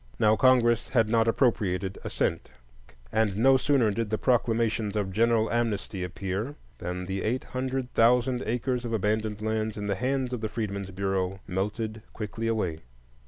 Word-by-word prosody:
Now 110 -1 +4
Congress 120 -2 +4
had 115 -4 +3
not 115 0 +3
appropriated 100 -6 +1
a - - -4
cent, - - -1 0.6
and 105 -3 +1
no 135 +4 +5
sooner 130 -4 +3
did 115 +1 -2
the 110 - 0
proclamations 115 -4 +1
of 100 -2 -1
general 115 +1 +2
amnesty 110 -5 -1
appear 95 +8 -3 0.2
than 90 +1 -4
the 95 +1 -3
eight 120 +4 -1
hundred 130 0 -3
thousand 125 +2 +3
acres 125 +2 -1
of 120 -1 -4
abandoned 105 0 -1
lands 110 0 -1
in 105 - -4
the 100 - 0
hands 130 +3 -1
of 120 - -3
the 110 - -2
Freedmen's 100 -4 -3
Bureau 95 0 -2
melted 105 +4 -3
quickly 110 +1 -4
away. 95 -8 -1
110 Hz, 165 wpm, -27 LUFS, 100-120 Hz, 0.6 s, no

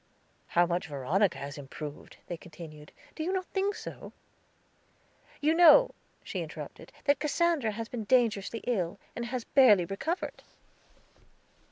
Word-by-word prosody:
"How 175 - +7
much 175 +2 -2
Veronica 160 +8 +1
has 140 +2 -6
improved," 145 +1 -8
they 175 - -4
continued, 155 -3 -11 0.2
"do 315 - -4
not - - 0
you - - -38
think 400 +1 +1
so?" - - -8 1.3
"You 305 +2 +3
know," 350 +9 +7 0.3
she - - -4
interrupted, - - -8
"that 285 0 +3
Cassandra 300 -6 +1
has 225 +1 -5
been 230 -3 -5
dangerously 230 -2 +2
ill, 195 -6 -1 0.2
and 240 - -3
has 245 -1 -3
barely 220 -11 +6
recovered." 315 - -3
215 Hz, 135 wpm, -30 LUFS, 170-285 Hz, 1.3 s, How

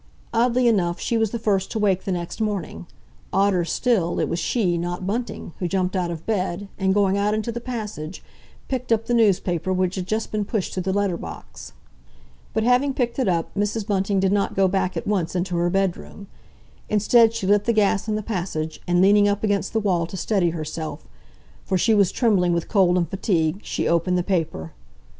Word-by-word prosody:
Oddly 240 +1 +3
enough, 180 -6 +1
she 235 - -1
was 225 -1 +2
the 235 - -3
first 205 -4 0
to - - -4
wake 195 -3 +1
the 195 - -1
next 175 +4 -4
morning; 185 - -3 0.4
odder 195 -2 +2
still, 180 -2 0
it - - +1
was 170 - -2
she, 180 -2 +1
not 175 +2 -3
Bunting, 225 -3 -4
who 180 - -1
jumped 185 0 -1
out 180 -2 0
of 165 -2 -6
bed, 195 -2 -2
and 190 -1 +2
going 200 -1 +2
out 210 +1 +1
into 220 +2 -2
the 235 +1 -5
passage, 210 -9 -6 0.4
picked 255 -2 -3
up 225 0 +2
the 240 - -1
newspaper 190 -6 +2
which 185 -1 +1
had 185 -2 -4
just 215 +2 -2
been 215 -1 -1
pushed 205 -2 -2
through 185 - -2
the 190 +1 -1
letter 200 -3 0
box. - - -9 0.8
But 220 - 0
having 250 +3 +2
picked 240 0 -1
it 255 - +1
up, 170 -3 0
Mrs. 205 +1 -1
Bunting 195 -1 0
did 190 0 +2
not 200 -1 0
go 195 0 +4
back 185 -1 -1
at - - -4
once 185 -5 -1
into 180 0 -1
her 175 +1 +1
bedroom. 195 +1 -2 0.6
Instead 225 +2 +4
she 195 - -3
lit 205 +1 +3
the 235 - +3
gas 210 -1 +2
in 215 - 0
the 215 - -3
passage, 175 -7 -4
and 175 +1 +3
leaning 205 +1 +5
up 205 +1 0
against 200 -2 0
the 225 - +1
wall 180 -5 0
to 190 - -7
steady 185 -2 +1
herself, 160 -1 -5 0.6
for 190 - 0
she 220 +5 +3
was 200 -3 +4
trembling 190 -8 +2
with 170 -1 -1
cold 185 -4 +3
and 170 -2 +1
fatigue, 175 -2 0
she - - -2
opened 170 +2 +2
the 180 - 0
paper. 165 - -2
195 Hz, 205 wpm, -23 LUFS, 175-215 Hz, 0.8 s, leaning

